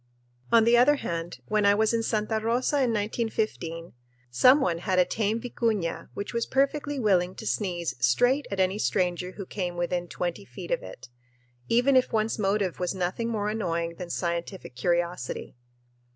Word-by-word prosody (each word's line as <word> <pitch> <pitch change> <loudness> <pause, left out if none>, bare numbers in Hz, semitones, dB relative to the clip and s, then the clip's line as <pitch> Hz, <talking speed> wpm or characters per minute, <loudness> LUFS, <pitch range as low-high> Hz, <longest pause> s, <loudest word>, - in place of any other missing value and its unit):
On 230 -1 +6
the 235 +1 +5
other 255 +5 +6
hand, 170 -9 -5
when 215 -1 +1
I 200 0 +5
was 220 +2 +2
in 230 - +1
Santa 220 0 0
Rosa 240 +6 0
in 260 -3 +2
1915 210 -6 -2 0.4
some 255 - +6
one 170 - 0
had 185 +1 -1
a 180 - +5
tame 215 +2 -1
vicuña 225 -7 -2
which 200 - -5
was 235 0 -1
perfectly 285 +1 0
willing 185 -5 +2
to 220 - -8
sneeze 175 - -1
straight 245 - +3
at 195 - -4
any 190 +2 +1
stranger 180 -2 0
who 200 - -7
came 180 -3 -4
within 175 0 -1
twenty 175 +3 -4
feet 200 - -9
of - - +1
it, - - -11 0.6
even 250 +4 +4
if 255 - +3
one's 220 0 0
motive 195 -2 0
was 180 +1 -1
nothing 185 +6 -2
more 210 -3 -1
annoying 170 -6 -2
than 180 -1 -6
scientific 170 -2 -3
curiosity. 170 -1 -2
205 Hz, 170 wpm, -27 LUFS, 175-230 Hz, 0.6 s, On